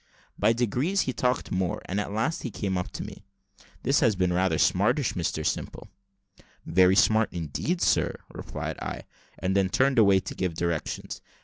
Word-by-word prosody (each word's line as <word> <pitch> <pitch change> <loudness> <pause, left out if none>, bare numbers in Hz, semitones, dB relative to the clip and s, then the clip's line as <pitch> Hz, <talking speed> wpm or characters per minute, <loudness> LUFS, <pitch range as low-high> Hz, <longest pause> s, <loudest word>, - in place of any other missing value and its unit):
By 105 +2 +3
degrees, 125 - +1
he 130 - -2
talked 125 0 -1
more, 95 -1 -1
and 95 +3 -2
at 100 - -5
last 115 +10 -1
came 95 -2 -2
up 90 0 -2
to - - -5
me. - - -9 0.6
"This 135 +3 +3
has 110 -3 +3
been 90 -1 +1
rather 95 +1 +1
smartish, 110 +8 +2
Mr 80 -3 -2
Simple." - - -3 0.8
"Very 90 +3 +4
smart 110 +2 +4
indeed, 85 - -2
sir," - - +2 0.2
replied - - -6
I; - - -5 0.3
and 95 +1 -1
then 95 -1 +2
turned 130 +4 +3
away 100 -3 +6
to - - -6
give 90 -3 -2
directions. 85 -1 -3
100 Hz, 170 wpm, -27 LUFS, 90-120 Hz, 0.8 s, away